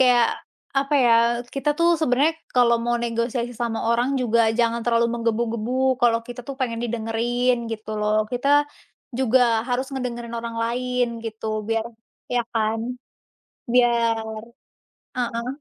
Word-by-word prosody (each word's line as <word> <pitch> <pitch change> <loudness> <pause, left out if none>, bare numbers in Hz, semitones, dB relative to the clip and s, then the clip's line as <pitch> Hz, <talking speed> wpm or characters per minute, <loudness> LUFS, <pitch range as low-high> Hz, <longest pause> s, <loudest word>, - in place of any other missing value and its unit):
Kayak 245 -2 +5 0.5
apa 280 +2 0
ya, 235 - +5 0.4
kita 275 +2 -1
tuh 340 0 +4
sebenarnya 295 +2 +3 0.2
kalau 235 -1 +5
mau 240 0 +1
negosiasi 235 +1 -2
sama 230 -2 -1
orang 240 +2 +2
juga 235 -1 +2 0.2
jangan 235 0 +2
terlalu 235 -1 +3
menggebu-gebu, 230 0 -1 0.3
kalau 230 -1 +4
kita 245 0 -7
tuh 275 - -5
pengen 230 -2 -1
didengerin 235 +2 0 0.2
gitu 215 0 -7
loh. 210 0 +1 0.2
Kita 245 +3 -1 0.7
juga 260 0 +3 0.3
harus 250 +2 0
ngedengerin 240 -3 -4
orang 230 0 -5
lain 250 +1 0 0.2
gitu 220 0 -6 0.2
biar 225 0 0 0.5
ya 240 - +3
kan? 220 0 0 0.9
Biar 235 -2 +3 1.0
heeh. 235 -1 -2
235 Hz, 130 wpm, -23 LUFS, 230-250 Hz, 1.0 s, Kayak